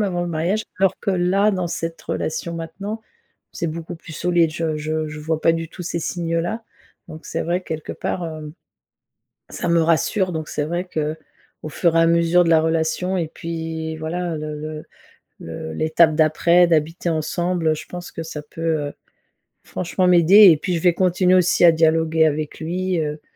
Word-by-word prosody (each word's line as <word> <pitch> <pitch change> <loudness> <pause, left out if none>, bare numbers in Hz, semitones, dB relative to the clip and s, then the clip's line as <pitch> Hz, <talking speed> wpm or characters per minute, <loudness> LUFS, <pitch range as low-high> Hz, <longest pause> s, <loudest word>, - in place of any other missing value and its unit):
même - - +3
avant 180 -4 -1
le 175 - -3
mariage. 175 +7 -1 0.2
Alors 190 -1 +2
que 200 - -1
là, 185 +3 +2
dans 185 -2 -2
cette 165 0 -5
relation 170 +2 -3
maintenant, 195 +7 -6 0.5
c'est 170 - -3
beaucoup 165 +2 -6
plus 160 0 -12
solide, 170 0 +2
je 160 -1 -2
je 155 +1 -2
je 150 0 -8
vois 160 +1 -2
pas 165 - +4
du 165 0 -3
tout 180 +2 -9
ces 170 0 -3
signes-là. 170 +6 -2 0.4
Donc 160 0 -10
c'est - - -3
vrai, 175 +2 -1
quelque 155 -3 -5
part, 180 - -3
heu, 155 -2 -7 1.0
ça - - -3
me 170 0 +4
rassure, 180 +4 +1
donc 155 -1 -4
c'est 150 - -2
vrai, 175 +4 -2
qu'au 155 0 -6
fur 165 +2 +1
et - - +5
à 165 - +5
mesure 170 +1 +4
de - - +1
la 160 -1 +5
relation 165 +3 0
et 170 -3 -1
puis 160 -1 -5
voilà, 170 +1 -3
le 150 0 -5
le 155 0 -7 0.6
le 80 -1 -7
l'étape 160 - +3
d'après, 170 +3 +4
d'habiter 165 +2 0
ensemble 165 +1 0
je - - -9
pense 175 0 -8
que 165 - -5
ça 155 -2 -7
peut, 155 +2 -10 0.3
heu, - - -8 0.7
franchement 185 +1 -1
m'aider 180 +3 +8
et 160 - +5
puis 180 +1 -2
je - - -2
vais 175 -2 +4
continuer 185 0 +2
aussi 180 -1 +3
à 170 - +7
dialoguer 160 0 +3
avec 150 0 -2
lui, 180 +2 -2
heu, 150 0 -3
165 Hz, 190 wpm, -21 LUFS, 155-175 Hz, 1.0 s, m'aider